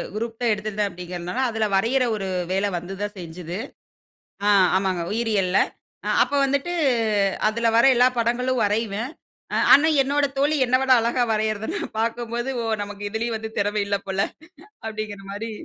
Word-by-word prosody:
Group 225 +1 -4
தான் 235 -2 +2
எடுத்திருந்தேன் 210 -1 -2
அப்டீகுறனால, 180 +3 -6
அதுல 225 -1 0
வரையிற 235 +7 +2
ஒரு 195 -2 -4 0.2
வேலை 195 +2 +1
வந்து 175 +3 -6
தான் 205 0 -3
செஞ்சது. 170 +1 -7 0.9
ஆ, - - +4 0.3
ஆமாங்க 190 -3 -1
உயிரியல்ல. 210 -5 +1 0.5
அ - - -1
அப்போ 285 - 0
வந்துட்டு, 280 +5 0 0.8
அதுல 230 +1 +1
வர 235 - +5
எல்லா 250 +1 +5
படங்களும் 245 +2 +1
வரைவேன். 215 +3 -1 0.4
அ - - +1 0.2
ஆனா, 300 +3 +5
என்னோட 285 +2 +1
தோழி 290 +3 +2
என்ன 250 +1 +3
விட 265 -1 +3
அழகா 235 +2 +1
வரையிறத 215 0 -1
நான் - - -5
பாக்கும்போது, 235 +2 -2
"ஓ! - - -2 0.2
நமக்கு 205 0 -7
இதுலயும் 225 +1 -2
வந்து 220 0 -6
திறம 205 +1 0
இல்ல 200 - +1
போல" 190 0 -1 0.7
அப்டீங்குற 215 -2 -5
மாரி 215 +3 -5
220 Hz, 155 wpm, -23 LUFS, 200-240 Hz, 0.9 s, வர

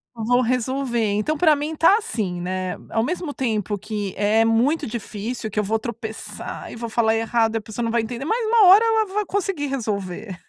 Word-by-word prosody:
Vou 245 +3 +2
resolver. 255 0 -1
Então, 285 +9 0
pra 310 -2 +5
mim 300 +2 -3
tá, 355 +7 +5
assim, 200 - -3
né. 185 0 -3
Ao 225 - +1
mesmo 325 0 -3
tempo 215 -5 -1
que 205 -1 -4
é 210 +2 +3
muito 235 +8 +2
difícil, 220 0 -5
que 210 - -11
eu - - +2
vou 220 +2 0
tropeçar 220 -1 -6
e - - -8
vou 230 0 -5
falar 220 -1 +2
errado 225 0 +1
e - - +3
a - - -3
pessoa 220 +3 -5
não 230 - -1
vai 235 -1 +2
entender, 245 +4 -5
mas 450 +5 0
uma 435 -3 +5
hora 405 +5 +8
ela 445 -1 +3
vai 420 -1 0
conseguir 375 -7 -2
resolver. 200 -6 -4
235 Hz, 205 wpm, -22 LUFS, 215-290 Hz, -, hora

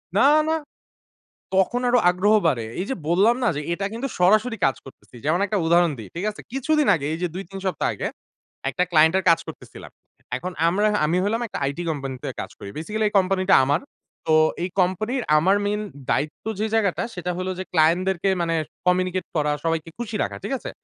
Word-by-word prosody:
না, 205 - +4 0.3
না। - - +2 1.0
তখন 190 +6 +2
আরো 245 0 +4
আগ্রহ 185 +4 +2
বাড়ে। 130 -8 +1 0.2
এই 185 - -1
যে 265 - -1
বল্লাম 195 +8 +4
না - - +3
যে - - -2
এটা 195 +3 -3
কিন্তু 240 +4 -3
সরাসরি 215 +6 +3
কাজ 135 - +2
করতেছি। 135 -1 -15
যেমন 160 +4 +2
একটা 205 +1 -1
উদাহরণ 170 0 +4
দেই। 110 - -9
ঠিক 175 +4 -3
আছে? - - -12
কিছুদিন 290 +3 +1
আগে 145 -4 -4
এই - - -3
যে - - +2
২,৩ 195 +1 -7
সপ্তাহ 180 -6 0
আগে। - - -3 0.6
একটা 180 - 0
ক্লায়েন্ট 160 0 +5
এর 190 - -3
কাজ 165 - +5
করতেছিলাম। - - -10 0.5
এখন 180 +8 -5 0.2
আমরা 205 +5 +2 0.2
আমি 160 +3 +1
হইলাম 215 +4 0
একটা - - -6
আইটি 140 +5 -2
কোম্পানি 135 -3 -4
তে 145 - -4
কাজ - - -6
করি। 100 - -8
বেসিক্যালি 215 +7 -1
এই 210 - -13
কোম্পানি 185 0 +1
টা - - +8
আমার। 145 +5 +1 0.5
তো 160 - +3 0.3
এই 180 - -1
কোম্পানির 215 +8 0 0.2
আমার 190 +6 +3
মেইন 210 +1 -1 0.3
দায়িত্ব 150 +1 -1
যে 215 - 0
জায়গাটা 205 -5 +1
সেটা 180 -1 -4
হলো 185 +1 -2
যে, 185 - -3
ক্লায়েন্ট 165 +1 +4
দেরকে 190 0 0
মানে 165 -1 0 0.3
কমিউনিকেট 185 0 +1
করা, 150 -1 +1
সবাইকে 165 0 -1
খুশি 230 -2 -4
রাখা। - - -3
ঠিক 205 - -3
আছে? - - -7
185 Hz, 200 wpm, -23 LUFS, 165-210 Hz, 1.0 s, টা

